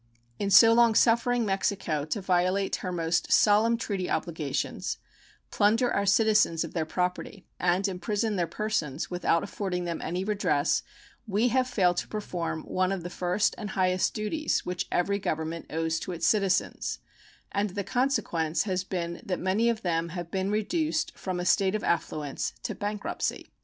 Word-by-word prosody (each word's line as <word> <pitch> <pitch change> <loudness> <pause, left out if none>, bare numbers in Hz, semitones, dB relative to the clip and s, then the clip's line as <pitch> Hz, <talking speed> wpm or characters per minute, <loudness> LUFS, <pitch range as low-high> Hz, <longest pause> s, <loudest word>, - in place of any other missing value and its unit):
In 200 - -1
so 225 +3 +8
long 230 -1 +5
suffering 235 +1 +3
Mexico 195 -6 -1
to 180 +7 -3
violate 185 +1 +1
her 185 - -4
most 165 -1 -1
solemn 220 +3 +5
treaty 195 -5 -3
obligations, 155 -5 -2 0.5
plunder 225 +4 +3
our 200 0 0
citizens 210 -5 +3
of - - -7
their 160 -3 -1
property, 180 +2 -3
and 180 +2 +2
imprison 205 +3 -1
their 175 -3 0
persons 170 -10 -2
without 175 -2 +1
affording 180 -3 -3
them 170 -1 -3
any 180 +3 -2
redress 195 -8 +1 0.5
we 215 +4 +2
have 255 +1 +2
failed 185 -8 +2
to - - -2
perform 170 -6 -4
one 185 0 0
of 190 -3 -3
the 175 - -6
first 180 +4 +1
and 210 -3 -5
highest 185 -1 +1
duties 220 +9 -1
which 180 0 -3
every 200 +3 +1
government 160 -2 -3
owes 160 0 -1
to 185 - -5
its 165 -1 -2
citizens, 195 -3 +1 0.5
and 205 +1 0
the 200 +2 -4
consequence 195 - 0
has 185 -3 -1
been 170 -2 -4
that 180 -2 -2
many 200 +6 +2
of 230 -2 -2
them 170 -1 0
have 175 -1 -6
been 190 0 -1
reduced 310 - -1
from 185 -2 -4
a 180 - -3
state 190 +1 +3
of 215 - -3
affluence 150 -4 -2
to - - -2
bankruptcy. 205 0 -3
190 Hz, 165 wpm, -28 LUFS, 175-210 Hz, 0.5 s, so